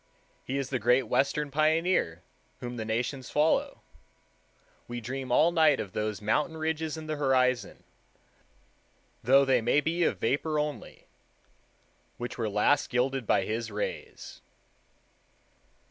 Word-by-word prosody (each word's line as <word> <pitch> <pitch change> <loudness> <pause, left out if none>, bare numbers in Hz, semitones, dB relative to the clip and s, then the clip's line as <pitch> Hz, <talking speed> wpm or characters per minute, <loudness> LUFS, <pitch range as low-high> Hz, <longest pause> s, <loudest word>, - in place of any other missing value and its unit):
He 135 - -3
is 135 -2 -3
the 130 - 0
Great 125 +4 +3
Western 140 +5 0
Pioneer 155 - +1 0.4
whom 120 0 -6
the 110 - -4
nations 125 +4 -3
follow. 150 +2 +1 1.0
We 120 0 -5
dream 130 +2 -5
all 160 +7 +4
night 160 -3 +4
of 95 - -5
those 105 -1 -3
mountain 150 +9 0
ridges 160 0 -2
in 160 - -7
the 155 -1 -3
horizon, 130 -5 +1 1.4
though 135 +4 +5
they 130 -2 +3
may 120 +5 +3
be 165 +3 0
of - - +1
vapor 150 +6 0
only, 150 -1 -4 1.1
which 120 0 -5
were 115 -3 -2
last 105 +8 +2
gilded 125 -1 0
by 95 - +2
his 115 +1 -3
rays. 105 0 -6
135 Hz, 130 wpm, -28 LUFS, 120-150 Hz, 1.4 s, though